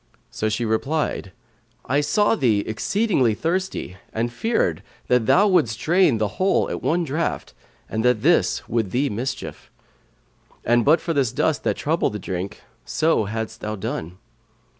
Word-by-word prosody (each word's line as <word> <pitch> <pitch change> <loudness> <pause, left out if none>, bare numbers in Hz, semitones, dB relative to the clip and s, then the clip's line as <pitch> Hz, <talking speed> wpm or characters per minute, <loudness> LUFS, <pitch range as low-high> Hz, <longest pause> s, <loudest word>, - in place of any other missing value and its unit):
so 110 - -1
she 110 +2 -1
replied, 115 -2 -1 0.5
"I 140 +3 +1
saw 175 +10 +2
thee 115 - +2
exceedingly 130 - +1
thirsty 170 - -2
and 120 +2 -2
feared 120 - 0 0.3
that 125 -3 +3
thou 205 +3 +5
wouldst 155 - +2
drain 170 -6 +3
the 105 -1 +1
whole 190 +1 +3
at - - -4
one 175 +2 +1
draught 160 +2 -2 0.3
and 110 0 -2
that 125 -3 +2
this - - +2
would 115 -4 -1
thee 130 +6 0
mischief; 120 +6 -5 1.0
and 120 0 +3
but 155 +6 +4
for 165 - -2
this 135 -6 +1
dust - - 0
that - - +1
troubled - - 0
the - - -3
drink 95 +1 -5 0.2
so 160 -8 +1
hadst 110 +1 -5
thou 105 0 -3
done." 95 - -5
120 Hz, 155 wpm, -23 LUFS, 110-165 Hz, 1.0 s, thou